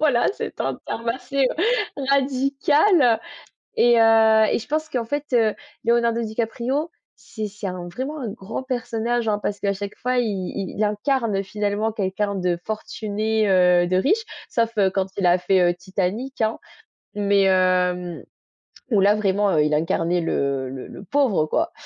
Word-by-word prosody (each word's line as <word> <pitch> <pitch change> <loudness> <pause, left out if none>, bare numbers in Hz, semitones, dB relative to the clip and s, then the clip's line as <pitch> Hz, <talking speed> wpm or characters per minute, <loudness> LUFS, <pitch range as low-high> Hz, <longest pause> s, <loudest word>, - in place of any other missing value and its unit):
Voilà 280 -6 +3
c'est - - -6
un - - -1
terme 230 +1 -4
assez 260 +2 0 0.6
radical, 280 +5 +3
heu 230 -2 +4 0.6
et 240 -1 +5
heu 220 -1 +5
et - - +2
je - - -10
pense 310 +1 -2
qu'en 245 -5 -2
fait, 290 +4 -3
heu, 225 -3 +3 0.3
Leonardo 235 0 +2
DiCaprio 235 +8 -2 0.2
c'est 215 -2 -6
c'est 205 0 -7
un 180 -1 -5
vraiment 270 - -5
un 230 - -3
grand 215 +4 -6
personnage, 240 -2 -2
hein. 205 - 0
Parce 205 0 -3
qu'à 200 0 0
chaque 200 +1 -6
fois 250 0 -1
i 245 - +1
i 195 -2 -4
il 215 - +1
incarne 210 -1 0
finalement 210 +2 -1
quelqu'un 200 -1 -2
de 180 -2 0
fortuné, 215 0 -2
heu, 180 -1 +4
de 185 +1 +1
riche. 410 - +2 0.3
Sauf, 230 -1 +1
heu, 195 -2 +4
quand 190 -1 -1
il 195 - 0
a 175 +1 +5
fait, 185 +1 +2
heu, 175 0 +3
Titanic, 195 +8 -3
hein, 220 +1 0 0.6
mais 200 -1 +2
hem 180 -2 +1 0.7
où 205 -4 +4
là 205 +2 +5
vraiment, 205 -1 +1
heu, 150 -3 +3
il 150 0 0
incarnait 165 +3 +1
le 140 -4 -1
le 130 0 -7
le - - -10
pauvre 220 - +1
quoi. 325 - 0
215 Hz, 170 wpm, -22 LUFS, 190-240 Hz, 0.7 s, et